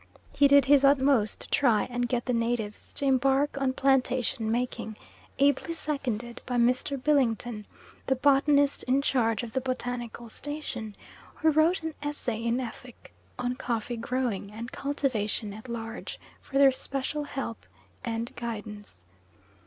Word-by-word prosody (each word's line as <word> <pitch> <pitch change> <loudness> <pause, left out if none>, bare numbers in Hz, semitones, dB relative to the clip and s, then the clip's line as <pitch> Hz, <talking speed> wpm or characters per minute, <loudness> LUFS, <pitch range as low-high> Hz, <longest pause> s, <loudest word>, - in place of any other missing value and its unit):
He 285 - +6
did 280 -1 +6
his 280 0 +5
utmost 270 -5 +3
to - - -9
try 235 -6 +4
and 245 0 -2
get 245 -1 -1
the 250 - 0
natives 230 -3 -2
to 280 - +4
embark 270 +2 +2
on 260 -1 +1
plantation 255 -4 +1
making, 230 -2 -2 0.4
ably 285 +4 +2
seconded 245 -7 -3
by 250 - -2
Mr. 250 +4 +2
Billington, 240 -6 +1 0.4
the 265 - +3
botanist 285 +1 +3
in 265 +2 +2
charge 230 -5 +1
of 225 -2 -7
the 260 - 0
botanical 245 -2 -4
station, 245 -5 -6 0.4
who 315 -1 +3
wrote 320 +4 +3
an 320 0 -3
essay 285 -6 -3
in 235 +1 +1
Effik 250 -1 -8 0.3
on 250 0 -1
coffee 240 -2 -3
growing 235 -4 -2
and 230 +3 -7
cultivation 230 -7 -1
at 220 +4 -10
large 225 0 -6 0.2
for 275 - -4
their 275 -1 +7
special 275 +3 -3
help 270 -5 -5 0.4
and 230 -1 -3
guidance. 210 - -7
250 Hz, 145 wpm, -28 LUFS, 230-275 Hz, 0.4 s, their